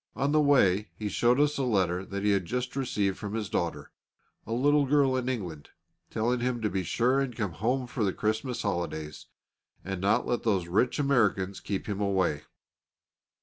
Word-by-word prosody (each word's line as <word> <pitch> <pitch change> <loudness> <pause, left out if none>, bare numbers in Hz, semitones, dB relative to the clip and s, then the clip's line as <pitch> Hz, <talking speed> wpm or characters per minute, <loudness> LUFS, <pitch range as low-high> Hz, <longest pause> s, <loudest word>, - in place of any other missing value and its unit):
On 140 +2 0
the 155 0 +4
way 105 -9 +3
he 105 -1 -4
showed 120 +5 +2
us 150 0 +2
a - - +1
letter 95 -7 +1
that 100 +1 -5
he 105 - +3
had 100 -3 +1
just 125 +3 -3
received 105 -8 -1
from 105 0 -5
his 105 -4 -3
daughter, 85 -1 -2 0.6
a - - -6
little 145 +4 +3
girl 140 -2 +3
in 130 0 -1
England, 90 - -5 0.4
telling 120 +3 0
him 125 0 -1
to 105 - 0
be 95 0 0
sure 120 +9 +1
and 135 -4 -2
come 100 -5 -2
home 125 +9 -1
for 120 -2 -3
the 100 - +2
Christmas 110 +5 -2
holidays, 85 -6 -3 0.6
and 95 -1 -4
not 100 +1 +2
to - - -7
let 120 - 0
those 95 -6 0
rich 105 +8 +1
Americans 105 -9 +1
keep 100 -2 -4
him 105 -1 -3
away. 95 -7 +1
110 Hz, 190 wpm, -28 LUFS, 95-125 Hz, 0.6 s, the